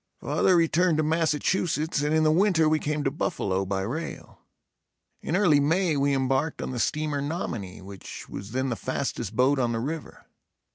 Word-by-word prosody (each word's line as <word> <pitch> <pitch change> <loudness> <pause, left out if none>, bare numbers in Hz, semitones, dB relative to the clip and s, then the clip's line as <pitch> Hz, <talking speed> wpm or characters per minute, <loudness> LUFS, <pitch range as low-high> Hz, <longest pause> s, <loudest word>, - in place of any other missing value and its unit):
Father 185 - +2
returned 165 0 +3
to 155 - +2
Massachusetts 160 0 0
and 150 +1 0
in 155 0 +3
the 155 - +4
winter 170 -2 +3
we 155 0 +2
came 150 0 -2
to 135 - 0
Buffalo 95 -9 -1
by 95 0 -1
rail. 150 +12 -6 0.8
In 160 - -2
early 175 -7 +4
May 165 +3 +2
we 140 0 +2
embarked 135 +3 0
on - - -4
the 125 - -4
steamer 150 +1 -1
"Nominee," 120 - -4
which 95 -1 -9
was 100 - -7
then 130 +3 -1
the 120 - -1
fastest 120 -4 -3
boat 130 +3 +3
on 120 -2 +1
the 115 - -1
river. 150 +6 -6
145 Hz, 180 wpm, -26 LUFS, 125-160 Hz, 0.8 s, the